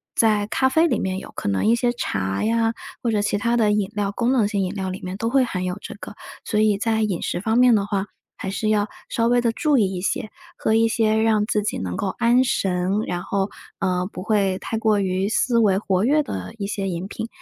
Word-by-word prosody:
在 215 -2 +3
咖 260 +4 +2
啡 320 +6 +3
里 250 - 0
面 190 0 -2
有， - - -11
可 - - -4
能 100 -1 +1
一 225 - +5
些 240 0 +1
茶 95 - -2
呀 225 0 +1 0.3
或 240 - 0
者 215 -2 +1
其 205 0 0
他 235 +3 +1
的 220 -3 +3
饮 210 -2 0
料， 205 -1 0
功 240 +4 0
能 240 -5 +3
性 200 -2 0
饮 185 +1 -2
料 190 -2 -3
里 185 +2 -5
面 185 +1 -4
都 225 +2 -1
会 265 +1 +3
含 185 -6 -3
有 180 +1 -3
这 - - -8
个， 205 - -10 0.3
所 210 - -1
以 215 -2 +3
在 220 +1 0
饮 205 -5 -1
食 - - -2
方 220 +3 +1
面 250 -1 +6
的 205 -3 +2
话， 200 -1 -2 0.3
还 190 - -4
是 215 +2 -2
要 210 -1 +2 0.2
稍 230 0 +1
微 245 +1 +3
地 235 -1 +2
注 295 +3 +2
意 195 -5 +2
一 180 - -4
些， 205 +2 -2 0.3
喝 220 - 0
一 225 0 +4
些 220 -1 +2
让 220 -2 +3
自 210 -2 0
己 210 - -2
能 90 -1 -4
够 195 - -1
安 240 +2 +4
神， 185 -7 0 0.2
然 175 0 -3
后， 195 0 -1 0.3
呃， 180 -1 0
不 - - -7
会 195 -2 +1
太 225 - -3
过 215 -2 +2
于 190 +1 0
思 235 +2 +1
维 200 -4 +4
活 190 -2 0
跃 300 +4 +4
的 255 - -6
一 200 -2 -3
些 195 -1 -3
饮 175 +1 -4
品。 225 - -5
210 Hz, 270 characters per minute, -22 LUFS, 190-230 Hz, 0.3 s, 面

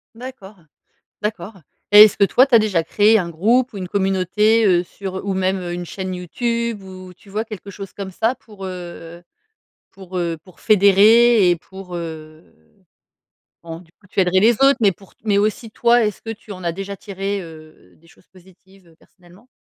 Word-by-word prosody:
D'accord. 225 -5 -11 0.7
D'accord 210 -2 -5 0.3
et 210 +1 +11
est-ce 215 - +2
que - - -1
toi 250 +7 +4
tu 270 - 0
as 230 - +7
déjà 195 -6 0
créé 215 +6 +3
un 175 - -3
groupe 235 +10 +1
ou - - -10
une 185 -2 -6
communauté, 200 +3 +1
heu, 180 -3 +3
sur 190 +1 -7
ou 195 - -1
même 190 0 0
une 175 0 -5
chaîne 185 +1 -6
Youtube 230 +4 -3
où, 185 -1 -11
tu 195 +3 -20
vois 215 +2 -3
quelque 215 -3 -10
chose 195 0 -9
comme 195 -2 -7
ça? 225 +7 -1
Pour, 205 -3 -13
heu 175 -2 -9 0.7
pour, 185 -1 -8
heu, 170 -1 -2
pour 185 -1 -20
fédérer 210 +1 +5
et 175 - +4
pour, 185 +1 -12
heu 160 -2 -8 1.2
bon 165 0 -8
du 165 - -21
coup 195 - -26
tu 195 - -1
aiderais 185 0 +2
les 225 +4 +5
autres 275 +4 +4
mais 200 -3 +4
pour 195 +2 -20
t - - -46
mais 205 -2 +2
aussi 215 +2 -1
toi 240 0 +3
est 210 - -1
ce - - -22
que 225 - -7
tu 215 -1 -9
en 185 -1 -10
as 170 - -1
déjà 195 +3 -7
tiré, 200 0 -5
heu, 155 -2 -15
des 165 - -26
choses 175 - -24
positives, 190 +1 -22
heu, 165 - -22
personnellement? 180 +7 -22
195 Hz, 200 wpm, -19 LUFS, 180-215 Hz, 1.2 s, et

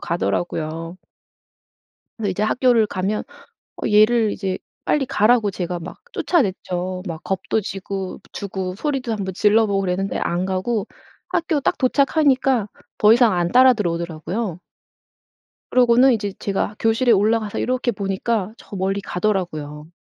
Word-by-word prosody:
가더라고요. 165 0 -2 1.2
근데 215 -3 -1
이제 190 +3 -1
학교를 235 0 +3
가면 200 +2 -2 0.6
어 - - 0
얘를 215 +1 +4
이제 190 -1 -3 0.3
빨리 280 -3 +1
가라고 215 -1 +3
제가 180 -2 -4
막 165 - -9
쫓아냈죠. 185 - -1
막 160 -2 -6
겁도 195 +3 -1
지고 195 -1 -5
주고 190 -2 -4
소리도 265 +1 -2
1 210 -3 -3
번 190 - -4
질러 215 +3 +4
보고 200 -1 0
그랬는데 195 +1 -1
안 175 +1 -1
가고 190 +3 -1 0.4
학교 330 -3 0
딱 - - 0
도착하니까 270 -4 +2 0.3
더 210 +1 +6
이상 235 -2 +5
안 175 -1 +1
따라 255 +1 +7
들어오더라고요. 170 0 -3 1.1
그러고는 250 +1 +5
이제 205 -3 -2
제가 200 +1 -2
교실에 225 +2 +2
올라가서 215 0 +2
이렇게 255 -1 0
보니까 200 +1 -2
저 - - -11
멀리 195 +1 -1
가더라고요. 165 -7 -3
205 Hz, 310 characters per minute, -21 LUFS, 185-235 Hz, 1.2 s, 따라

